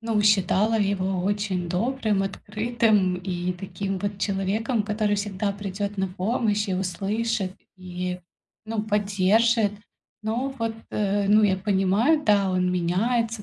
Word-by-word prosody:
ну, 225 -2 0
считала 210 +2 +3
его 190 -2 0
очень 200 -3 -1
добрым, 215 +1 0
открытым 210 -1 +1
и 180 -1 -3
таким 195 +1 -4
вот 205 0 -3
человеком, 210 +4 0
который 210 -1 0
всегда 205 0 -2
придёт 200 0 -4
на 190 0 0
помощь 210 +2 -1
и 185 - 0
услышит, 195 +2 -1 0.2
и, 180 0 -5 0.4
ну, 220 -1 -2
поддержит. 210 +1 +2 0.5
Но 250 +5 -2
вот, 225 -1 -1 0.2
э, 200 -1 0
ну, 215 +1 +6
я 190 -2 +3
понимаю, 205 +10 +2
да, 200 -2 +3
он 180 0 +1
меняется, 215 +6 0
205 Hz, 130 wpm, -25 LUFS, 190-220 Hz, 0.5 s, ну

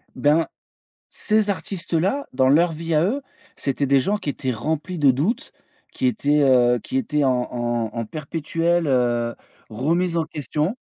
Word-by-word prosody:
Ben, 150 +5 +3 0.6
ces 215 -1 0
artistes 190 -2 -4
là 195 - +1
dans 130 0 +3
leur 165 +4 +4
vie 165 +1 -3
à 155 +2 +4
eux, 265 +8 -1 0.3
c'était 140 +1 -1
des 135 0 +4
gens 205 +8 0
qui 150 - -7
étaient 130 -2 -3
remplis 160 +8 -3
de 140 -3 +5
doutes, 155 - -1 0.4
qui 260 - -1
étaient, 150 - +2
heu, 125 -2 +4
qui 265 - -4
étaient 150 - 0
en 130 - +4 0.2
en 120 -2 -2
en 115 -1 -2
perpétuelle, 165 +4 -1
heu, 120 -2 +1 0.4
remise 165 +9 0
en 165 - +1
question. 155 - -2
150 Hz, 165 wpm, -22 LUFS, 130-175 Hz, 0.6 s, de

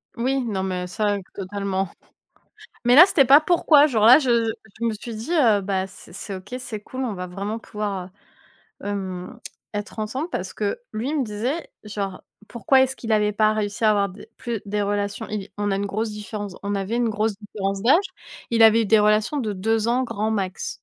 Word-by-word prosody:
Oui. 265 +3 0
Non 205 -5 -2
mais 180 -1 -3
ça, 205 +1 0 0.2
totalement. 195 -1 -3 1.0
Mais 245 +1 +6
là 330 - +11
c'était 375 -8 +3
pas 275 +4 +8
pourquoi 310 -3 +5
genre 220 -6 +2
là 245 +5 +10
je 265 -5 -1 0.2
je 225 - 0 0.3
je - - 0
me 230 - +1
suis 220 +2 -7
dit: 230 +10 -6
«Heu, 230 -11 +4
bah, 190 -1 -1
c'est 195 - -15
c'est 200 +1 -6
OK, 190 +6 -8
c'est 220 -4 -6
cool, 260 +4 -6
on 235 - -2
va 180 -1 -5
vraiment 200 +5 -4
pouvoir, 205 -4 -4 0.8
heu, - - -4
hem, 190 -3 -5
tss, - - -9 0.2
être 205 +1 -5
ensemble» 260 +10 -3
parce 190 - -4
que 210 - -2
lui 230 +6 -3
il 305 -2 0
me - - +1
disait 240 +9 -3 0.2
genre 200 -3 -5 0.3
pourquoi 260 +3 +3
est-ce 265 0 -1
qu'il 225 -2 -4
avait 210 -1 +3
pas 215 +1 +3
réussi 210 +1 -2
à 215 - +6
avoir 200 -1 +2
des 195 +4 -13
plus 235 -4 -4
des 205 +1 -1
relations, 205 0 -2
il 210 -2 -4
on 205 0 0
a 195 - +1
une 200 - -2
grosse 215 +3 -2
différence 210 -2 -6
on 200 0 -1
avait 200 +3 -2
une 240 -1 +1
grosse 215 0 0
différence 195 -2 -4
d'âge. 315 - +4 0.5
Il 230 -1 +3
avait 225 +1 +6
eu - - -2
des 220 +2 +5
relations 215 +6 +2
de 225 -7 -1
2 220 +3 0
ans 245 +2 +2
grand 215 -2 -2
max. 195 -3 -3
210 Hz, 215 wpm, -23 LUFS, 200-235 Hz, 1.0 s, là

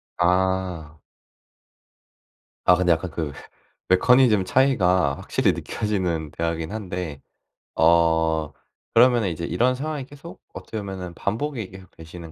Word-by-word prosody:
아. 90 -3 0 1.7
아 90 - +6
근데 90 -1 +2
약간 85 +1 0
그 80 -3 -4 0.6
메커니즘 110 +1 +4
차이가 95 - +2
확실히 - - 0
느껴지는 90 -7 -3
대화이긴 80 0 -3
한데 90 -9 -5 0.5
어 80 -2 +2 0.4
그러면은 120 -4 +4
이제 85 0 -4
이런 120 +10 +1
상황이 145 0 -4
계속 145 +5 -13
어떻게 110 - -8
보면은 95 -3 -7
반복이 115 - -3
계속되시는 85 -3 -12
90 Hz, 270 characters per minute, -23 LUFS, 80-110 Hz, 1.7 s, 아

